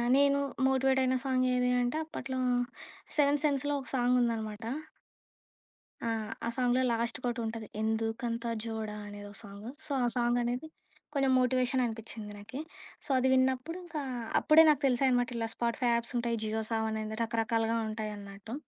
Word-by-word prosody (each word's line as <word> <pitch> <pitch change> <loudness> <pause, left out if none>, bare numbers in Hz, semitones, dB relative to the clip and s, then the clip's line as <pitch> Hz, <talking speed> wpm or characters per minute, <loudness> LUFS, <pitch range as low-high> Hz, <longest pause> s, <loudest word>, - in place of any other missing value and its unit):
నేను 280 0 +4 0.3
మోటివేట్ 265 0 +3
అయిన 260 0 +2
సాంగేది 255 -1 +2
అంటే 245 +5 0
అప్పట్లో 260 -4 -4 0.8
'సెవెన్త్ 290 0 +3
సెన్స్‌' 285 -1 +1
లో 290 - +1
ఒక 255 - -8
సాంగుందనమాట. 235 -3 +1 1.4
ఆ! - - +1 0.4
ఆ - - +1
సాంగ్‌లో 250 0 +2
లాస్ట్‌కి 235 +2 -1
ఒకటుంటది. 225 -2 -3
'ఎందుకంత 225 +2 -1 0.2
జోడా' 220 -2 -4
అనేదో 205 0 -8
సాంగు. 205 +1 -9 0.2
సో, 305 - -7
ఆ - - +3
సాంగనేది 245 +3 +1 0.5
కొంచెం 275 -2 +2
మోటివేషననిపిచ్చింది 240 -4 0
నాకీ. 225 +6 -8 0.5
సో, - - -7
అది 255 - +3
విన్నప్పుడు 260 +5 +1
ఇంకా 320 -3 -4 0.4
అప్పుడే 315 +1 +7
నాకు 295 -1 +3
తెలిసాయి 260 +1 +3
అనమాట. 245 0 +2
ఇలా 225 -1 -1
స్పాటిఫై 240 +1 0
యాప్స్ 235 +1 -2
ఉంటాయి. 235 -1 0
జియో 220 +1 -1
సావన్ 220 -1 0
అని 215 0 -5
రకరకాలుగా 225 0 +1
ఉంటాయన్నట్టు. 210 -1 -6
240 Hz, 140 wpm, -31 LUFS, 225-260 Hz, 1.4 s, అప్పుడే